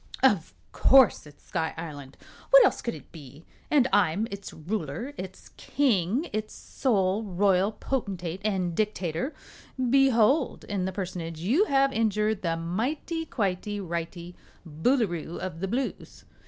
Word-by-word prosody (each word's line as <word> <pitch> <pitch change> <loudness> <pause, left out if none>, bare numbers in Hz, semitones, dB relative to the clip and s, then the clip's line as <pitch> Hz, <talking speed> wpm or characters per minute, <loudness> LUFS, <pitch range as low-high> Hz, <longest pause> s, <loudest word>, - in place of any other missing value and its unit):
"Of 190 - +3 0.2
course 260 - +5
it's 145 - -18
Sky 160 -1 -3
Island. 145 -5 -8 0.3
What - - +9
else - - +1
could 235 - -3
it - - -14
be? 150 -1 -13 0.2
And 275 -4 +4
I'm 200 +2 +3
its 200 0 -7
Ruler 175 - -4
its 190 -4 -9
King 245 - +1
its 215 0 -3
sole 200 -5 0
Royal 195 0 +2
Potentate 190 -9 -3
and 190 -5 0
Dictator. 200 - -2 0.6
Behold 270 0 +3
in 195 -3 -2
the 190 - -2
Personage 175 -4 -5
you 260 - +3
have 275 -5 +2
injured 215 -1 +1
the 165 -2 -1
Mighty 265 - -3
Quitey 205 -1 -2
Righty 170 -1 -5 0.3
Boolooroo 175 - 0
of 180 -3 -5
the 195 - -2
Blues!" 250 +6 -4
195 Hz, 135 wpm, -27 LUFS, 170-235 Hz, 0.6 s, What